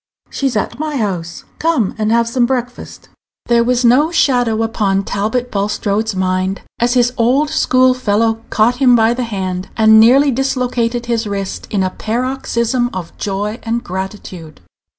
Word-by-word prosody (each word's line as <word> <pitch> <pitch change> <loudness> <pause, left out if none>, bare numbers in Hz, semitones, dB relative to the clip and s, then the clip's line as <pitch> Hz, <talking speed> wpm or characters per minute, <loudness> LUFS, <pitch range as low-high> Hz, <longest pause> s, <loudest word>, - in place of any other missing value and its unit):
"She's 270 -5 -1
at 235 +4 -3
my 305 -2 -3
house. 180 -7 -3 0.2
Come 310 - +1
and 215 0 -1
have 230 0 +2
some 240 0 +1
breakfast." 245 -1 -5 0.4
There 235 -1 +3
was 245 +1 +1
no 265 +7 +4
shadow 245 -9 +1
upon 200 -3 0
Talbot 220 +6 -2
Bulstrode's 205 +1 -1
mind 185 +1 -1 0.2
as 245 +2 +1
his 245 0 +2
old 265 +6 +2
school 255 0 +3
fellow 225 -2 0
caught 230 +3 +2
him 255 -2 +5
by 225 0 +3
the 250 0 -3
hand, 185 -4 -4
and 220 0 +6
nearly 270 +6 +5
dislocated 245 -2 -1
his 230 -2 -1
wrist 195 -1 -5
in 195 -3 0
a 185 - -1
paroxysm 240 +1 -2
of 180 -3 -7
joy 205 +3 -3
and 235 +1 -3
gratitude. 185 - -7
230 Hz, 155 wpm, -16 LUFS, 205-250 Hz, 0.4 s, and